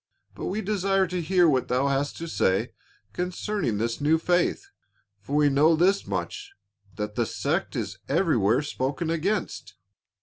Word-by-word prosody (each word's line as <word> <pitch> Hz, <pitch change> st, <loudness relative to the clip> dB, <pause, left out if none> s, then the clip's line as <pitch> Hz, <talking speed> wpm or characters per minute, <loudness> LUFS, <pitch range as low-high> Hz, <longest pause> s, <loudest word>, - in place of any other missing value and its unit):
But -, -, -7 dB
we 210 Hz, +3 st, -2 dB
desire 195 Hz, -1 st, +1 dB
to 180 Hz, 0 st, -3 dB
hear 180 Hz, +1 st, +3 dB
what 130 Hz, -5 st, +2 dB
thou 125 Hz, +2 st, +1 dB
hast 140 Hz, +1 st, -1 dB
to 165 Hz, -, -5 dB
say 95 Hz, -, +1 dB, 0.4 s
concerning 180 Hz, -, -2 dB
this 115 Hz, +5 st, -2 dB
new 155 Hz, +3 st, +3 dB
faith, 175 Hz, -, +1 dB, 0.5 s
for 120 Hz, +8 st, -5 dB
we 150 Hz, 0 st, +4 dB
know 145 Hz, +4 st, +4 dB
this 190 Hz, +5 st, +2 dB
much 405 Hz, -1 st, -4 dB, 0.4 s
that -, -, -4 dB
the -, -, 0 dB
sect -, -, -2 dB
is -, -, -4 dB
everywhere 125 Hz, -, +2 dB
spoken 145 Hz, +3 st, -2 dB
against." 180 Hz, +6 st, -2 dB
165 Hz, 155 wpm, -26 LUFS, 140-185 Hz, 0.5 s, we